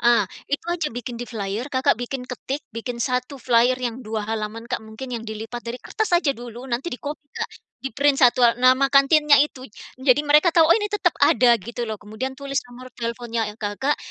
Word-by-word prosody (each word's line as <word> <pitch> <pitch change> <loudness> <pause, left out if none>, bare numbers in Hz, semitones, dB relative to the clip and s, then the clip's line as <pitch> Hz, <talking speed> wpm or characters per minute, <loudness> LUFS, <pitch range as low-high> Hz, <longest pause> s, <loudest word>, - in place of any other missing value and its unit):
Ah, 235 -3 +4 0.3
itu 285 - -1
aja 335 -3 -1
bikin 245 0 -5
di - - -3
flyer, 215 +3 -4
Kakak 260 -4 +2
bikin 250 +1 -4
ketik, 270 +3 -4
bikin 235 +1 -5
1 250 +3 -1
flyer 245 +1 +3
yang 245 0 -3
2 215 -1 -3
halaman, 220 +1 -4
Kak, - - -2
mungkin 220 +4 -9
yang 230 -1 -5
dilipat 225 +2 -6
dari 235 +1 -4
kertas 435 -3 -2
aja 305 -5 +1
dulu, 240 +1 -9
nanti 245 +7 -2
di 250 - -5
copy, 295 0 -6
Kak. - - -3 0.3
Di 270 - -3
print 280 0 +3
1 245 -1 +5
a 235 - +6
nama 260 +2 +4
kantinnya 285 +1 +6
itu, 280 -3 -1 0.3
jadi 260 +1 +3
mereka 300 +4 +4
tahu, 325 -1 +5
"Oh, - - +7
ini 420 - -1
tetep 390 -5 +1
ada," 245 -4 +5
gitu 235 +3 -6
loh. 215 - -3
Kemudian 220 +6 -6
tulis 275 -1 -2
nomor 250 +1 -12
teleponnya 235 -2 -3
Kakak, 230 +8 -1
250 Hz, 205 wpm, -23 LUFS, 230-275 Hz, 0.3 s, Oh